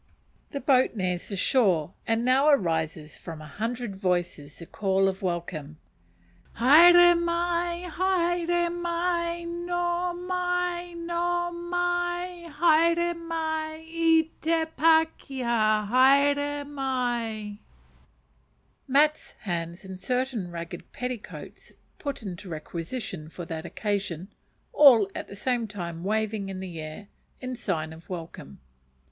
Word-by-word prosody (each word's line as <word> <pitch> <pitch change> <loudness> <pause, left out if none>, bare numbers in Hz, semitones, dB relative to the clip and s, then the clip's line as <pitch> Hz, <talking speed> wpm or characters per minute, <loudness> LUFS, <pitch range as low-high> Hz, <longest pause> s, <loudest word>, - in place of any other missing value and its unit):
The 280 - -4
boat 260 -3 +3
nears 180 -3 -2
the 200 - -3
shore, 185 - +2
and 225 +1 +1
now 265 +4 +4
arises 160 - 0
from 165 -3 -8
a 155 - -10
hundred 225 - -4
voices 175 -6 -2
the 170 - -9
call 195 +1 +1
of 190 +1 -2
welcome, 170 -4 -4 0.8
"Haere 350 +8 +8
mai! 345 +1 -1
haere 350 -1 +1
mai! 345 0 -1 0.3
hoe 350 0 0
mai! 360 -1 -2
hoe 345 0 0
mai! 350 0 -2
haere 335 +2 +3
mai, 320 -1 -4
e 325 -1 +3 0.2
te 325 0 +1
pa 320 0 +5
ke 265 -2 -6
ha, 215 -3 +2
haere 285 +4 +3
mai!" 240 -7 -2 1.3
Mats, 300 +3 +2
hands, 170 -1 -4
and 190 -1 -8
certain 250 -3 -2
ragged 170 0 -8
petticoats 250 -3 -7 0.3
put 280 -5 -5
into 185 -1 -7
requisition 165 +2 -6
for 175 +1 -8
that 165 +1 -5
occasion, 195 -4 -3 0.4
all 245 -9 +7
at - - -6
the 200 - -10
same 240 +1 -1
time 170 -5 -6
waving 215 0 -1
in 190 -1 -5
the 180 -3 -7
air 155 +7 -8 0.3
in 255 0 -5
sign 160 -9 -3
of 160 +1 -15
welcome. 165 - -8
255 Hz, 120 wpm, -27 LUFS, -, 1.3 s, Haere